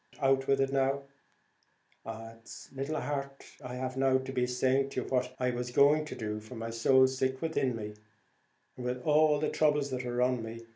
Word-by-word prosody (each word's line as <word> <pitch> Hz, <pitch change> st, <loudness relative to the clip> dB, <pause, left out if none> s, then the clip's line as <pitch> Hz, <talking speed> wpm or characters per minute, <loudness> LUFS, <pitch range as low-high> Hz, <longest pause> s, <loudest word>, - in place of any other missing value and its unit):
out 135 Hz, -1 st, +2 dB
with 135 Hz, 0 st, +3 dB
it 135 Hz, 0 st, +1 dB
now." 135 Hz, +1 st, +1 dB, 1.0 s
"It's 115 Hz, 0 st, -9 dB
little 140 Hz, +3 st, -3 dB
heart 140 Hz, -1 st, -4 dB, 0.2 s
I 125 Hz, 0 st, -6 dB
have 130 Hz, 0 st, -4 dB
now 135 Hz, 0 st, +4 dB
to 130 Hz, 0 st, -5 dB
be 125 Hz, -1 st, +1 dB
saying 130 Hz, +2 st, +1 dB
to 130 Hz, -, -2 dB
you -, -, -7 dB
what 125 Hz, -1 st, -1 dB
I 125 Hz, -2 st, 0 dB
was 125 Hz, 0 st, -3 dB
going 145 Hz, +4 st, +4 dB
to 155 Hz, -, -7 dB
do, 105 Hz, -1 st, -4 dB
for 110 Hz, +4 st, -11 dB
my 115 Hz, 0 st, -5 dB
soul's 130 Hz, +3 st, +4 dB
sick 130 Hz, 0 st, 0 dB
within 135 Hz, -6 st, 0 dB
me, 105 Hz, -2 st, -6 dB, 0.8 s
with 125 Hz, 0 st, -4 dB
all 150 Hz, 0 st, +4 dB
the 155 Hz, -, 0 dB
throubles 150 Hz, -2 st, +2 dB
that 130 Hz, 0 st, -3 dB
are 125 Hz, 0 st, 0 dB
on 125 Hz, -1 st, +1 dB
me. 115 Hz, +1 st, -8 dB
130 Hz, 195 wpm, -31 LUFS, 125-135 Hz, 1.0 s, now